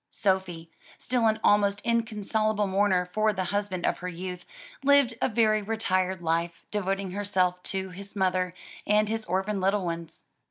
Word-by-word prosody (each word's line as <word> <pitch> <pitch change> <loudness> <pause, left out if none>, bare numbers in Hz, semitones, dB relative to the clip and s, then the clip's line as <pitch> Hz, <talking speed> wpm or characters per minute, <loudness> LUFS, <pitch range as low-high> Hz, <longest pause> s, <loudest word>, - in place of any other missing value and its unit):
Sophie, 185 -5 -1 0.3
still 245 -2 +1
an 220 0 +1
almost 205 -1 +4
inconsolable 215 -2 0
mourner 190 -2 +2
for 215 +4 +1
the 185 - -2
husband 200 -3 -1
of - - 0
her 180 - -5
youth, 180 0 -6 0.4
lived 280 -3 +5
a - - +2
very 215 -2 +3
retired 190 -4 -1
life, 165 +1 -1
devoting 195 -2 -2
herself 185 -2 0
to 190 0 -4
his 200 +3 -10
mother 185 -2 0 0.3
and 210 0 +3
his 225 0 -2
orphaned 190 +3 -1
little 195 0 +1
ones. 170 -1 -5
195 Hz, 155 wpm, -27 LUFS, 180-215 Hz, 0.4 s, lived